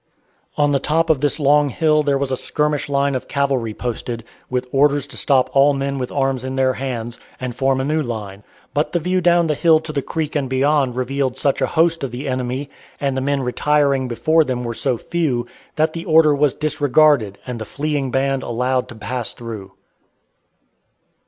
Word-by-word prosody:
On 145 -1 +3
the 140 - +2
top 165 +3 +1
of 140 -4 0
this 145 +1 0
long 145 0 +4
hill 155 +3 +2
there 140 -2 +1
was 135 -1 -2
a - - +1
skirmish 150 +2 -1
line 140 0 +1
of 130 - -3
cavalry 135 -5 0
posted, 120 -1 -4 0.3
with 125 0 -1
orders 140 0 +3
to - - -7
stop 135 -2 +2
all 140 +1 +5
men 140 0 -2
with 125 - -4
arms 135 -2 0
in 130 0 -4
their 130 -1 +2
hands, 120 -3 -5 0.2
and 125 -1 -4
form 135 0 +1
a - - 0
new 155 +2 +1
line; 105 -6 -6 0.3
but 150 +3 -1
the 175 - +2
view 180 +3 0
down 175 0 +4
the 155 - +1
hill 160 +1 +4
to 160 -1 -7
the 140 - 0
creek 155 +1 -4
and 140 -3 -1
beyond 135 -1 +1
revealed 130 0 -1
such 140 - 0
a - - +2
host 165 -1 +3
of 135 - -2
the 125 +4 -6
enemy, 130 +2 -2 0.3
and 140 -2 -1
the 130 - -1
men 140 0 0
retiring 140 +1 +1
before 155 +8 +2
them 125 -4 -3
were 120 -1 -3
so 125 +1 -1
few, 140 -5 -1 0.3
that 155 +1 +1
the 165 0 -6
order 160 -2 +5
was 145 -1 +2
disregarded 145 -7 +2
and 125 -2 -5
the - - -4
fleeing 145 +2 -2
band 135 +1 0
allowed 125 +2 -1
to 120 - -9
pass 115 0 -4
through. 110 -5 -8
135 Hz, 200 wpm, -20 LUFS, 125-150 Hz, 0.3 s, all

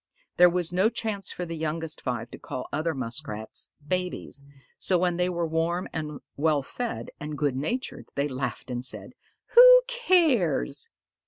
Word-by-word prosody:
There 180 0 +8
was 175 -1 -1
no 190 +5 +4
chance 220 -4 -3
for 180 - -4
the 165 -1 -5
youngest 160 0 -3
five 120 -2 -3
to - - -9
call 125 - -6
other 155 +1 0
Muskrats 115 -3 -4 0.2
"babies," 180 -5 -3 0.4
so 185 - +2
when 175 -1 +1
they 180 0 +1
were 170 -1 -1
warm 165 +3 -1
and 150 -2 -4
well 150 -1 +2
fed 240 - -5
and 150 -1 -5
good 145 -3 0
natured 235 - -3
they 140 +1 +1
laughed 130 -2 -4
and 120 0 -3
said, 130 - -6 0.4
"Who - - +10
cares?" 330 - +2
165 Hz, 160 wpm, -27 LUFS, 140-185 Hz, 0.4 s, Who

